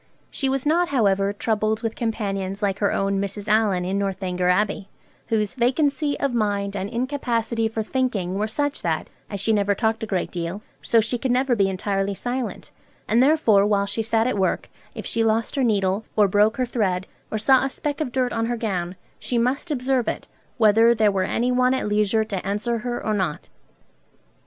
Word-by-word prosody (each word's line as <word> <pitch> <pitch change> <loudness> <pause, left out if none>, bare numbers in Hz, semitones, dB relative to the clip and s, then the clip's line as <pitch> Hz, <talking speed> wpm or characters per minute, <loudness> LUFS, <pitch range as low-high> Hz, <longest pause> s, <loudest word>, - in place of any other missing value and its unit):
She 270 - -1
was 270 0 -1
not, 340 +4 +2
however, 200 -6 +2
troubled 215 +1 -1
with 225 -1 -2
companions 200 -4 -3
like 195 -1 0
her 205 - +2
own 195 0 0
Mrs. 200 +1 -5
Allen 210 -4 +2
in 195 +2 -1
'Northanger 185 -2 -1
Abbey,' 200 +1 0 0.4
whose 215 -2 0
'vacancy 280 +3 +1
of 275 -3 0
mind 205 -3 -1
and 195 0 -3
incapacity 235 -2 -1
for 220 0 -3
thinking 215 -7 -1
were 205 +3 -1
such 290 +6 -2
that, - - -2 0.2
as 200 - -4
she 220 +3 +2
never 200 -1 +2
talked 220 +1 0
a 220 - -3
great 190 -4 -2
deal, 175 +3 -4 0.2
so 230 - +3
she 230 +2 -2
could 260 - -2
never 250 0 +2
be 195 -3 +2
entirely 195 +1 -1
silent; 245 +3 -4 0.4
and 230 +3 +3
therefore, 260 -8 +4
while 200 -1 +2
she 225 - -2
sat 225 0 +1
at 245 -5 0
work, 190 - -1 0.2
if - - -6
she 230 - +1
lost 225 0 0
her 275 - +1
needle, 200 -3 +1
or 210 -2 +5
broke 210 +3 +3
her 255 - +1
thread, 195 -6 -1 0.2
or 220 - -2
saw 260 +5 +4
a 270 - 0
speck 290 +3 -4
of 255 - -2
dirt 255 0 0
on 225 0 0
her 240 0 -1
gown, 185 -5 -2 0.2
she 245 - -1
must 255 +8 0
observe 260 -3 0
it, - - -3 0.3
whether 225 +1 +5
there 215 -2 +3
were 190 -1 0
any 245 +5 0
one 255 +1 +3
at 260 - -2
leisure 210 +1 +2
to 200 -4 -4
answer 210 +4 -1
her 240 +1 -4
or 215 - +1
not.' 190 -7 -2
220 Hz, 200 wpm, -23 LUFS, 200-245 Hz, 0.4 s, or